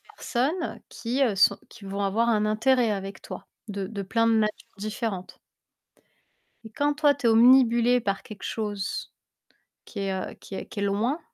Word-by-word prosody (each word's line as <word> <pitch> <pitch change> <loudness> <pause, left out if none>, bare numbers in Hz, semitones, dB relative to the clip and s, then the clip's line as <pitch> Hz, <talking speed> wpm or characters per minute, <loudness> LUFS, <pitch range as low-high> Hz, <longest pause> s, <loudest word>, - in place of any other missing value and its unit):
personnes 300 +8 -2
qui, 245 +4 -2
heu, 225 -6 +1
sont 185 - +5
qui 225 - -14
vont 195 +1 -4
avoir 225 +4 +1
un 215 -2 +2
intérêt 235 +2 +2
avec 195 -1 -5
toi. - - -9 0.2
De 200 -2 -4
de 200 -2 -5
plein 230 +4 +1
de 225 - +4
manières 215 -1 +3 0.3
différentes 210 -2 -4 1.3
et 220 - -10
quand 290 +5 0
toi, 290 -1 +4
tu 255 -3 -2
es - - +6
obnubilé 240 +1 +6
par 200 -3 -2
quelque 210 -3 -10
chose 205 -3 -3 0.7
qui 205 - -8
est, 195 -1 -1
heu, 190 - -4
qui 195 - -10
est - - -5
qui 205 - -7
est - - 0
loin, 220 +10 0
220 Hz, 180 wpm, -26 LUFS, 200-245 Hz, 1.3 s, es